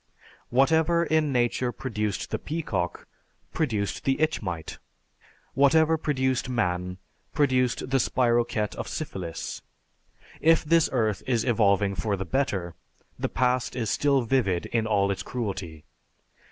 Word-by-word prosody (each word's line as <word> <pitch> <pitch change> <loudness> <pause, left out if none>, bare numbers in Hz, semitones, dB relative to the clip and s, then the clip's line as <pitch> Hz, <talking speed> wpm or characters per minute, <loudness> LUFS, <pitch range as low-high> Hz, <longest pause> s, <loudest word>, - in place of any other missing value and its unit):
Whatever 160 +6 +3
in 155 -3 +1
nature 120 0 +1
produced 105 -6 -3
the - - -1
peacock 105 - -3 0.5
produced 110 -10 -1
the 135 0 +1
itch 155 +1 +1
mite; 85 -6 -5 0.7
whatever 155 +4 +4
produced 130 -5 -1
man 90 -6 -1 0.4
produced 130 -3 +1
the 135 - +3
spirochete 120 -4 +1
of - - -4
syphilis. 95 - -5 0.8
If 165 0 +4
this 165 +1 +4
earth 110 -6 0
is 120 -3 +1
evolving 100 -4 +2
for 100 +3 -1
the 95 - -4
better, 95 -8 -1 0.5
the - - -1
past 125 0 0
is 115 -4 -1
still 140 -3 +2
vivid 110 -8 +1
in 115 -2 -1
all 100 -2 +2
its 95 - -3
cruelty. 95 -10 -5
120 Hz, 125 wpm, -26 LUFS, 100-135 Hz, 0.8 s, whatever